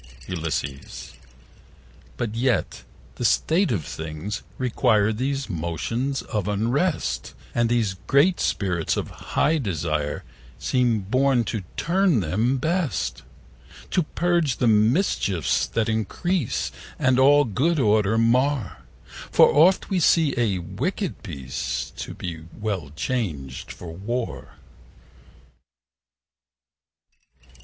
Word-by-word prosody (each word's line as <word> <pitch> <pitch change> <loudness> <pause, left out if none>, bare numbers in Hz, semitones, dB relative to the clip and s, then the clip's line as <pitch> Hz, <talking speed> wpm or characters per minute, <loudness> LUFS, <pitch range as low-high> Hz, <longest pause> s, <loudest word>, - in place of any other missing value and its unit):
Ulysses.But 115 -3 -2
yet 125 +2 0 0.3
the - - -4
state 170 +1 +2
of 90 -10 -1
things 80 +6 -5 0.2
require 110 -4 +2
These 135 +4 -2
motions 110 - -2
of 105 -3 -3
unrest: 115 - -1 0.2
And 120 -1 +2
these 115 -5 +1
great 160 +7 +4
Spirits 90 -5 0
of - - -3
high 155 +2 0
desire 75 - -2 0.3
Seem 120 - +1
born 130 +4 +2
to 110 -1 -3 0.2
turn 180 - +2
them 110 +11 +1
best: 140 - -1 0.6
60 - - -19
To 180 - +3
purge 170 -4 0
the - - +1
mischiefs 105 - +2
that 115 -1 -1
increase 115 - -1 0.3
And 130 0 +3
all 145 +2 +6
good 145 - +1
order 110 -2 +3
mar: 125 0 +2 0.5
For - - +6
oft 180 +8 +4
we 190 - +2
see 160 -3 +4
a 115 -6 +1
wicked 85 -1 -3
peace 65 -2 -4
To - - -6
be 80 -3 -6
well 100 -10 -3
changed 75 - -3
for 85 -2 -9
war. 115 +7 -4
115 Hz, 105 wpm, -24 LUFS, 95-140 Hz, 0.6 s, all